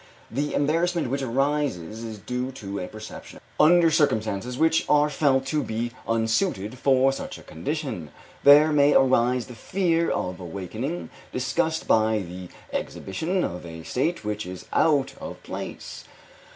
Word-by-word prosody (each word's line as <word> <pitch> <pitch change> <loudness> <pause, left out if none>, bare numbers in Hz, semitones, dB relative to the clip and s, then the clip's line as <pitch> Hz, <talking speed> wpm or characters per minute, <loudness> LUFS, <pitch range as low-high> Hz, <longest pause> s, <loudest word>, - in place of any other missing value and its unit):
The 145 +5 -1
embarrassment 165 0 +1
which 140 +1 -1
arises 130 - -1
is 110 -2 -6
due 125 +5 -3
to 100 -4 -6
a 90 - -4
perception 110 0 -10
of - - -18
this - - -31
fact - - -30
under 170 0 +6
circumstances 125 - +1
which 160 +1 +3
are 150 0 +4
felt 135 -3 +2
to 150 - +2
be 115 0 -3 0.2
unsuited 115 - 0
for 135 0 +4
such - - -6
a - - -13
condition. 115 - -4 0.3
There 145 +2 +8
may 145 0 +5
arise 125 -2 +3
the 125 - -10
fear 170 - 0
of 90 0 -2
awakening 100 - -5 0.2
disgust 160 +5 -1
by 110 0 +3
the 90 0 -8 0.3
exhibition 165 - -2
of 90 +1 -4
a 80 -1 -9
state 135 - -1
which 105 -1 -3
is 90 0 -8
out 145 -4 +3
of - - -8
place. - - -7
130 Hz, 155 wpm, -25 LUFS, 110-150 Hz, 0.3 s, There